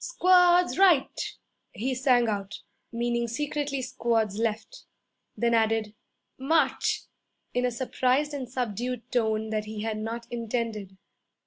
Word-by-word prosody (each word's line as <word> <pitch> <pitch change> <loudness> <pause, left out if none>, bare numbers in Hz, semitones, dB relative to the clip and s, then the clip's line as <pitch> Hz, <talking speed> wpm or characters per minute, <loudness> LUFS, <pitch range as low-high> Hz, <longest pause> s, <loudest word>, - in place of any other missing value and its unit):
'Squads 360 -6 +4
right!' 350 -8 +3 0.4
he 260 +4 -2
sang 250 -2 +3
out 200 -2 -4 0.3
(meaning 235 0 -1
secretly 285 +2 -2
squads 230 -5 0
left); 225 - -3 0.5
then 235 0 +1
added, 220 -1 +1 0.5
'March!' 275 0 +1 0.5
in 245 0 +1
a - - +1
surprised 260 +4 0
and 265 -4 -5
subdued 245 0 -3
tone 220 -2 0
that 215 -1 -1
he 215 0 -6
had 220 -1 -2
not 230 +2 -4
intended. 225 -4 -3
235 Hz, 120 wpm, -27 LUFS, 220-265 Hz, 0.5 s, Squads